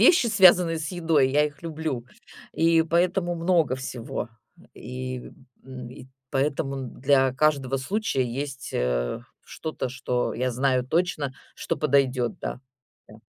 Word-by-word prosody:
вещи, 260 - +6
связанные 180 -6 +5
с 155 - -4
едой. 160 -6 +2
Я 150 +2 +4
их 150 +2 -11
люблю, 155 -7 -3 0.5
и 165 0 +4
поэтому 175 +2 +1
много 165 -5 +2
всего. 125 -2 -5 0.5
И, 130 +2 -5 0.5
м, 130 -2 -8
и 125 0 -11 0.2
поэтому 135 0 0
н 130 -3 -7
для 135 -1 +4
каждого 135 -2 +2
случая 190 +1 -1
есть, 135 +2 -5
э, - - -1 0.2
что-то, 155 -4 -5
что 125 -1 -2
я 130 +2 0
знаю 130 0 +1
точно, 155 -3 0 0.2
что - - -3
подойдёт, 130 -3 +1
да, - - -4 0.5
да. - - -13
140 Hz, 135 wpm, -25 LUFS, 130-165 Hz, 0.5 s, вещи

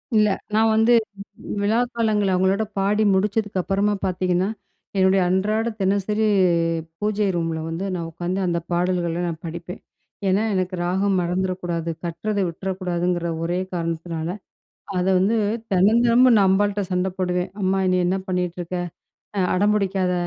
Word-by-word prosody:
இல்ல, 215 0 +5 0.3
நான் 220 +1 +4
வந்து 225 +2 +4 0.7
விழா 215 +3 +2 0.2
காலங்கள்ல 210 -4 +1
அவங்களோட 190 +3 +2
பாடி 205 +2 +2
முடிச்சதுக்கப்புறமா 205 0 0
பார்த்தீங்கன்னா, 185 0 0 0.5
என்னுடைய 190 0 +4
அன்றாட 210 +4 +1 0.2
தினசரி 200 +3 +1 0.7
பூஜை 210 0 0
ரூம்ல 165 -1 -1
வந்து 165 +4 -3
நான் 170 -2 -4
உட்காந்து 175 +3 -3
அந்த 170 -1 0
பாடல்கள 175 -1 0
நான் 165 -1 -5
படிப்பேன். 170 +2 -7 0.5
ஏனா 195 +3 +2
எனக்கு 185 0 -1
ராகம் 190 +2 +1
மறந்துட 185 +2 -1
கூடாது. 170 -1 -2 0.2
கட்றத 200 +5 -3
விட்டுறக்கூடாதுங்கிற 175 -1 -2
ஒரே 175 +2 -1
காரணத்தினால 165 -1 -3 0.7
அத 180 - +1
வந்து 200 +5 +2 0.4
தெனம் 200 +5 +4
தெனமும் 240 +1 +6
நான் 195 - +4
அம்பாள்ட்ட 205 +1 +2
சண்ட 180 +1 +1
போடுவேன். 180 0 -1
"அம்மா 190 0 +1
நீ - - +3
என்ன 185 +2 +1
பண்ணிட்டு 180 -1 -2
இருக்க? 175 +1 -4 0.6
அ - - +2
அடம் 205 +3 +3
பிடிக்காத 190 -3 0
185 Hz, 135 wpm, -22 LUFS, 175-205 Hz, 0.7 s, தெனமும்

